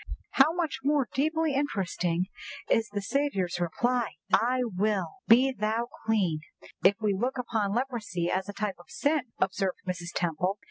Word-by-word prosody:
_'" -, -, -4 dB, 0.2 s
"How 280 Hz, +3 st, +5 dB
much 330 Hz, -5 st, -2 dB
more 285 Hz, -2 st, +2 dB
deeply 315 Hz, +2 st, +1 dB
interesting 185 Hz, -, 0 dB, 0.4 s
is 225 Hz, 0 st, +2 dB
the 205 Hz, -1 st, -3 dB
Saviour's 200 Hz, -10 st, 0 dB
reply, 240 Hz, +7 st, 0 dB, 0.2 s
'I 250 Hz, +2 st, +4 dB
will, 210 Hz, -, 0 dB
be 255 Hz, +4 st, +6 dB
thou 230 Hz, 0 st, -1 dB, 0.2 s
clean,' 190 Hz, -8 st, +2 dB, 0.4 s
if 190 Hz, +3 st, +6 dB
we 210 Hz, -2 st, +1 dB
look 245 Hz, +7 st, -1 dB
upon 220 Hz, -5 st, -1 dB
leprosy 215 Hz, -9 st, -1 dB
as 190 Hz, +1 st, -1 dB
a -, -, -4 dB
type 205 Hz, -3 st, -3 dB
of 175 Hz, -, -17 dB
sin," 285 Hz, -3 st, 0 dB
observed 190 Hz, 0 st, 0 dB
Mrs. 175 Hz, -1 st, -3 dB
Temple. 180 Hz, +3 st, 0 dB
220 Hz, 155 wpm, -28 LUFS, 190-265 Hz, 0.4 s, be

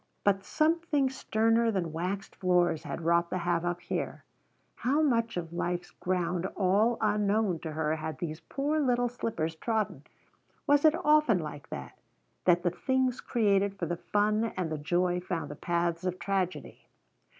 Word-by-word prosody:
But 195 Hz, -1 st, +2 dB
something 310 Hz, -1 st, +1 dB
sterner 225 Hz, -2 st, +2 dB
than 180 Hz, -7 st, -1 dB
waxed 185 Hz, +4 st, -3 dB
floors 175 Hz, -3 st, +2 dB
had 145 Hz, +3 st, -5 dB
wrought 170 Hz, +1 st, +2 dB
the -, -, -1 dB
havoc 175 Hz, 0 st, -1 dB
here. -, -, -4 dB, 0.5 s
How 285 Hz, +5 st, +2 dB
much 230 Hz, -8 st, +1 dB
of 170 Hz, -1 st, -4 dB
life's 175 Hz, 0 st, -2 dB
ground 180 Hz, 0 st, -1 dB
all 205 Hz, +5 st, +3 dB
unknown 210 Hz, -3 st, +1 dB
to 160 Hz, 0 st, -6 dB
her 155 Hz, 0 st, 0 dB
had 155 Hz, 0 st, -5 dB
these 160 Hz, -2 st, -4 dB
poor 280 Hz, -, -1 dB
little 245 Hz, -4 st, +2 dB
slippers 210 Hz, -10 st, -3 dB
trodden? 220 Hz, +5 st, -2 dB, 0.6 s
Was 290 Hz, +1 st, +4 dB
it 310 Hz, 0 st, +6 dB
often 300 Hz, -8 st, +5 dB
like 150 Hz, -3 st, -6 dB
that? 65 Hz, -2 st, -7 dB, 0.5 s
that 175 Hz, -1 st, +4 dB
the 175 Hz, -, +2 dB
things 260 Hz, +5 st, 0 dB
created 200 Hz, -4 st, +1 dB
for 175 Hz, -, -2 dB
the 170 Hz, +1 st, -2 dB
fun 210 Hz, +4 st, +1 dB
and 175 Hz, -4 st, -2 dB
the 155 Hz, -, -2 dB
joy 175 Hz, +4 st, +1 dB
found 170 Hz, -5 st, -4 dB
the -, -, -6 dB
paths 170 Hz, +1 st, -1 dB
of 185 Hz, -1 st, -2 dB
tragedy? 190 Hz, -2 st, -3 dB
185 Hz, 160 wpm, -29 LUFS, 170-230 Hz, 0.6 s, it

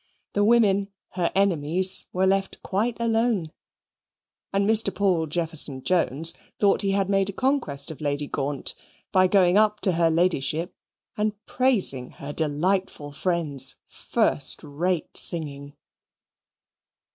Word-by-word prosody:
The 205 Hz, -, +1 dB
women, 205 Hz, -3 st, +3 dB, 0.2 s
her 175 Hz, -2 st, -2 dB
enemies, 185 Hz, -1 st, +2 dB
were 185 Hz, +1 st, 0 dB
left 195 Hz, 0 st, 0 dB
quite 225 Hz, +5 st, -2 dB
alone. 225 Hz, -7 st, 0 dB, 1.0 s
And 200 Hz, +1 st, 0 dB
Mr. 220 Hz, -2 st, +4 dB
Paul 180 Hz, -4 st, 0 dB
Jefferson 155 Hz, -4 st, -2 dB
Jones 165 Hz, -2 st, +1 dB, 0.3 s
thought 200 Hz, -2 st, +3 dB
he 200 Hz, -, 0 dB
had 195 Hz, -1 st, +1 dB
made 195 Hz, 0 st, +1 dB
a -, -, -5 dB
conquest 190 Hz, -, -1 dB
of 155 Hz, -, -11 dB
Lady 145 Hz, 0 st, -2 dB
Gaunt 140 Hz, 0 st, -2 dB, 0.4 s
by 185 Hz, 0 st, +4 dB
going 185 Hz, 0 st, +4 dB
up 210 Hz, 0 st, +2 dB
to 190 Hz, -, +3 dB
her 165 Hz, -1 st, +2 dB
Ladyship 165 Hz, -1 st, 0 dB, 0.4 s
and 210 Hz, 0 st, 0 dB
praising 205 Hz, -, +2 dB
her 145 Hz, +1 st, -8 dB
delightful 160 Hz, 0 st, -1 dB
friend's 145 Hz, -4 st, 0 dB
first 215 Hz, -, 0 dB
rate 160 Hz, +3 st, -3 dB
singing. 145 Hz, -4 st, 0 dB
180 Hz, 125 wpm, -24 LUFS, 150-200 Hz, 1.0 s, Mr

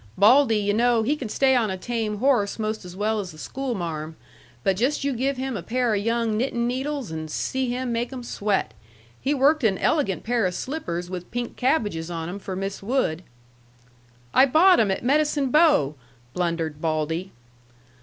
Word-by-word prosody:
Baldy, 225 Hz, +3 st, +5 dB
yu' 205 Hz, 0 st, 0 dB
know, 235 Hz, +1 st, +3 dB
he 280 Hz, +7 st, +1 dB
can 260 Hz, -7 st, -6 dB
stay 265 Hz, +4 st, +3 dB
on 230 Hz, -4 st, +2 dB
a 190 Hz, -, -3 dB
tame 220 Hz, 0 st, -2 dB
horse 235 Hz, -4 st, +2 dB
most 215 Hz, -1 st, -3 dB
as 180 Hz, 0 st, -9 dB
well 215 Hz, +2 st, 0 dB
as 190 Hz, -3 st, -5 dB
the 155 Hz, -, -14 dB
schoolmarm. 170 Hz, -, -4 dB, 0.5 s
But 195 Hz, -1 st, +2 dB
just 260 Hz, +9 st, 0 dB
you 280 Hz, -1 st, 0 dB
give 265 Hz, +3 st, -1 dB
him 260 Hz, -1 st, -3 dB
a 195 Hz, -, -3 dB
pair 245 Hz, +3 st, 0 dB
of 200 Hz, -, 0 dB
young 230 Hz, -1 st, 0 dB
knittin' 235 Hz, -1 st, 0 dB
needles 265 Hz, -, -3 dB
and 160 Hz, -1 st, -5 dB
see 260 Hz, +10 st, -2 dB
him 250 Hz, 0 st, -2 dB
make 235 Hz, +2 st, -2 dB
'em 255 Hz, -2 st, -6 dB
sweat! 200 Hz, -, -1 dB, 0.5 s
He 285 Hz, +2 st, +1 dB
worked 285 Hz, +2 st, +3 dB
an 200 Hz, -4 st, +3 dB
elegant 220 Hz, -, 0 dB
pair 230 Hz, -3 st, +1 dB
of 180 Hz, -, -4 dB
slippers 180 Hz, -, -4 dB
with 180 Hz, -1 st, -6 dB
pink 240 Hz, 0 st, -4 dB
cabbages 210 Hz, -, 0 dB
on 165 Hz, -1 st, -4 dB
'em 195 Hz, +3 st, -6 dB
for 190 Hz, -1 st, -6 dB
Miss 195 Hz, +1 st, -4 dB
Wood." 200 Hz, -7 st, 0 dB, 1.1 s
"I 265 Hz, -, +6 dB
bought 350 Hz, +7 st, +6 dB
'em 215 Hz, -, +3 dB
at 190 Hz, -, -1 dB
Medicine 285 Hz, 0 st, +2 dB
Bow," 300 Hz, -, +4 dB, 0.4 s
blundered 165 Hz, -4 st, -2 dB
Baldy. 160 Hz, +3 st, -1 dB
225 Hz, 185 wpm, -24 LUFS, 185-260 Hz, 1.1 s, I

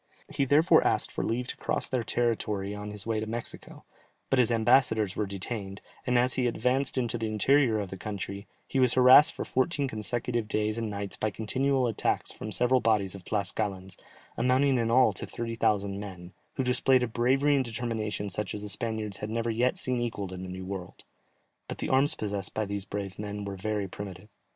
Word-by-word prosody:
He 145 Hz, -2 st, 0 dB
therefore 145 Hz, +5 st, +5 dB
asked -, -, +1 dB
for -, -, -3 dB
leave 120 Hz, +3 st, -1 dB
to -, -, -2 dB
cross -, -, 0 dB
their 130 Hz, -2 st, -1 dB
territory 105 Hz, -4 st, -1 dB
on 105 Hz, 0 st, -6 dB
his 105 Hz, -1 st, -6 dB
way 110 Hz, -1 st, 0 dB
to 110 Hz, -, -4 dB
Mexico; 115 Hz, +1 st, -6 dB, 0.5 s
but 135 Hz, -, +4 dB
his 125 Hz, -, +4 dB
ambassadors 110 Hz, -3 st, +3 dB
were 105 Hz, -, -1 dB
detained, 100 Hz, 0 st, -5 dB, 0.3 s
and 125 Hz, -1 st, +3 dB
as 125 Hz, +1 st, +3 dB
he 125 Hz, -2 st, +1 dB
advanced 130 Hz, +3 st, 0 dB
into 120 Hz, -2 st, 0 dB
the 110 Hz, -, -1 dB
interior 115 Hz, +2 st, +3 dB
of 100 Hz, -3 st, -4 dB
the 95 Hz, -, -6 dB
country, 100 Hz, 0 st, -6 dB, 0.2 s
he 135 Hz, -, -1 dB
was 125 Hz, -2 st, +4 dB
harassed 130 Hz, +3 st, +8 dB
for -, -, -5 dB
fourteen 140 Hz, +2 st, 0 dB
consecutive 120 Hz, 0 st, -2 dB
days 105 Hz, +1 st, -1 dB
and 115 Hz, -2 st, -2 dB
nights 100 Hz, -1 st, -5 dB
by 110 Hz, -, 0 dB
continual 130 Hz, +5 st, 0 dB
attacks 115 Hz, -3 st, 0 dB
from 110 Hz, -, -7 dB
several 125 Hz, +4 st, +3 dB
bodies 105 Hz, -4 st, +2 dB
of 100 Hz, -2 st, -10 dB
Tlascalans, 95 Hz, -2 st, -3 dB, 0.4 s
amounting 130 Hz, +2 st, +3 dB
in 115 Hz, -1 st, 0 dB
all 125 Hz, -2 st, +5 dB
to -, -, -6 dB
30,000 105 Hz, -4 st, -1 dB
men, 90 Hz, -3 st, -9 dB, 0.2 s
who 130 Hz, -, 0 dB
displayed 125 Hz, 0 st, +3 dB
a -, -, 0 dB
bravery 130 Hz, +5 st, +2 dB
and 135 Hz, -, +2 dB
determination 110 Hz, -4 st, -3 dB
such 105 Hz, +1 st, -2 dB
as 105 Hz, -, -6 dB
the 105 Hz, -, -5 dB
Spaniards 110 Hz, -2 st, -3 dB
had 105 Hz, -, -5 dB
never 115 Hz, +1 st, -1 dB
yet 120 Hz, +3 st, +1 dB
seen 125 Hz, -1 st, -1 dB
equalled 100 Hz, -5 st, -3 dB
in 90 Hz, -, -6 dB
the 95 Hz, -, -6 dB
New 95 Hz, 0 st, -6 dB
World. 95 Hz, -2 st, -7 dB, 0.6 s
But -, -, -6 dB
the -, -, -3 dB
arms 135 Hz, +2 st, +3 dB
possessed 100 Hz, -3 st, -3 dB
by 110 Hz, -, 0 dB
these 100 Hz, -1 st, -4 dB
brave 100 Hz, -1 st, -5 dB
men 105 Hz, -1 st, -5 dB
were 100 Hz, -1 st, -5 dB
very 105 Hz, +1 st, -2 dB
primitive. 95 Hz, +1 st, -8 dB
110 Hz, 200 wpm, -28 LUFS, 100-125 Hz, 0.6 s, harassed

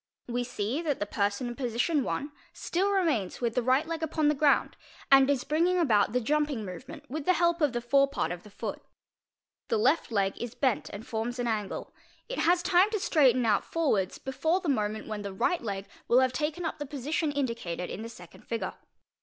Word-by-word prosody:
We 245 Hz, 0 st, -1 dB
see 245 Hz, +4 st, -2 dB
that 300 Hz, -5 st, -1 dB
the 205 Hz, -, -1 dB
person 205 Hz, +4 st, -1 dB
in 240 Hz, -, -4 dB
position 255 Hz, +3 st, 0 dB
I. 285 Hz, -, -2 dB, 0.2 s
still 380 Hz, +4 st, -1 dB
remains 320 Hz, -, 0 dB
with 235 Hz, -2 st, -1 dB
the 250 Hz, -, +1 dB
right 260 Hz, +5 st, +2 dB
leg 330 Hz, 0 st, -4 dB
upon 310 Hz, -1 st, +1 dB
the -, -, +3 dB
ground 290 Hz, 0 st, +2 dB, 0.4 s
and 270 Hz, 0 st, +7 dB
is 275 Hz, -3 st, +1 dB
bringing 340 Hz, +4 st, +2 dB
about 220 Hz, -, +3 dB
the 250 Hz, -, +1 dB
jumping 285 Hz, -2 st, 0 dB
movement 275 Hz, -, -9 dB
with 290 Hz, +2 st, -5 dB
the 365 Hz, -, +5 dB
help 340 Hz, 0 st, +2 dB
of 295 Hz, -3 st, +3 dB
the 240 Hz, -1 st, -2 dB
forepart 275 Hz, -2 st, +2 dB
of 175 Hz, -1 st, -5 dB
the 210 Hz, -, -14 dB
foot. 200 Hz, -, -5 dB, 0.9 s
The -, -, +1 dB
left 260 Hz, +6 st, +2 dB
leg 195 Hz, -3 st, +1 dB
is 240 Hz, 0 st, -5 dB
bent 255 Hz, -3 st, 0 dB
and 205 Hz, +3 st, -8 dB
forms 235 Hz, +1 st, -3 dB
an 245 Hz, -, -1 dB
angle. 215 Hz, -4 st, -3 dB, 0.3 s
It -, -, -4 dB
has 350 Hz, +1 st, +3 dB
time 365 Hz, +2 st, +4 dB
to 430 Hz, -1 st, -1 dB
straighten 260 Hz, -9 st, +3 dB
ont 210 Hz, -3 st, +3 dB
forwards 220 Hz, -, 0 dB
before 275 Hz, +7 st, 0 dB
the 355 Hz, -, -3 dB
moment 215 Hz, -4 st, -1 dB
when 215 Hz, -1 st, -5 dB
the 200 Hz, -1 st, -5 dB
right 350 Hz, -, 0 dB
leg 200 Hz, -4 st, -4 dB, 0.2 s
will 245 Hz, +2 st, +5 dB
have 260 Hz, -1 st, +2 dB
taken 305 Hz, +6 st, -2 dB
up 315 Hz, -1 st, -3 dB
the 290 Hz, -, -4 dB
position 295 Hz, +3 st, -1 dB
indicated 230 Hz, -11 st, -3 dB
in 205 Hz, -, -5 dB
the 230 Hz, -, -6 dB
second 175 Hz, -7 st, -14 dB
figure. 230 Hz, -1 st, -3 dB
260 Hz, 210 wpm, -29 LUFS, 220-310 Hz, 0.9 s, and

